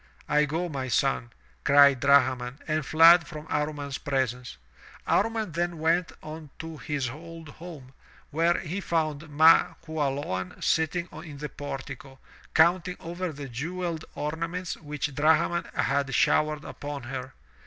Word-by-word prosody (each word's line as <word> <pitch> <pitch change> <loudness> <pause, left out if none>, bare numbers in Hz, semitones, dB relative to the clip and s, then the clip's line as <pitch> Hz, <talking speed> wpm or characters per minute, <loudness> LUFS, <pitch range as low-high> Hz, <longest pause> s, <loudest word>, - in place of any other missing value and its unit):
"I 150 0 +3
go, 165 +5 -2
my 135 -5 -4
son 125 -1 +1 0.2
!" - - -34
cried 140 -2 +6
Drahman, 130 -2 +3
and 155 0 0
fled 165 +3 +7
from 155 -2 -8
Amman's 150 -2 -2
presence. 130 - -2 0.5
Amman 225 -4 +1
then 175 +1 -2
went 165 +3 +1
on 155 -1 -8
to 165 -1 -7
his 135 +2 -2
old 165 +2 -10
home, 150 -5 -11 0.4
where 165 +3 +2
he 180 +5 -4
foimd 160 -3 -1
Ma 160 +3 +5
Qualoan 140 - -3
sitting 165 +2 0
in 155 -3 -9
the 150 +1 -5
portico, 135 -1 -7 0.4
counting 175 +2 +3
over 175 +1 -4
the 140 -2 -7
jewelled 165 +6 -4
oma 160 +3 -2
ments 180 -1 -4
which 150 -1 -4
Drahman 160 +4 +2
had 140 0 0
showered 150 -1 +2
upon 145 -2 -6
her. 130 +1 -6
150 Hz, 140 wpm, -27 LUFS, 140-165 Hz, 0.5 s, fled